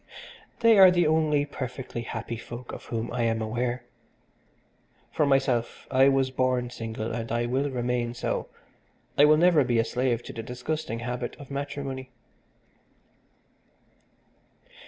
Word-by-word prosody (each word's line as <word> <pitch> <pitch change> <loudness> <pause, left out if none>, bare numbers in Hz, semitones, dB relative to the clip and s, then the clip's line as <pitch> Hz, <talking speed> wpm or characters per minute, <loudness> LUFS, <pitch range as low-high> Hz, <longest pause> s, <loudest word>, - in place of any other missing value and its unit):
They 230 -3 +6
are 190 -1 +10
the 175 -1 +3
only 155 -2 +2
perfectly 130 -3 -6
happy 115 0 -5
folk 120 +2 -8
of - - -8
whom 115 0 -4
I 125 - -1
am 115 -1 +1
aware. 120 +3 -2 1.3
For 150 - +1
myself, 135 -4 +1
I 135 +1 +6
was 135 -1 +2
born 130 -1 0
single 115 -1 -5
and 115 0 -4
I 120 0 0
will 135 +4 0
remain 120 -2 -1
so, - - -2 0.7
I 145 - +7
will 155 +1 +6
never 170 -3 +5
be 120 -2 +1
a 115 - +3
slave 120 -1 0
to - - -8
the 115 - -5
disgusting 125 0 -4
habit 125 0 -4
of 140 -1 -11
matrimony." 140 -2 -4
125 Hz, 140 wpm, -27 LUFS, 120-140 Hz, 1.3 s, are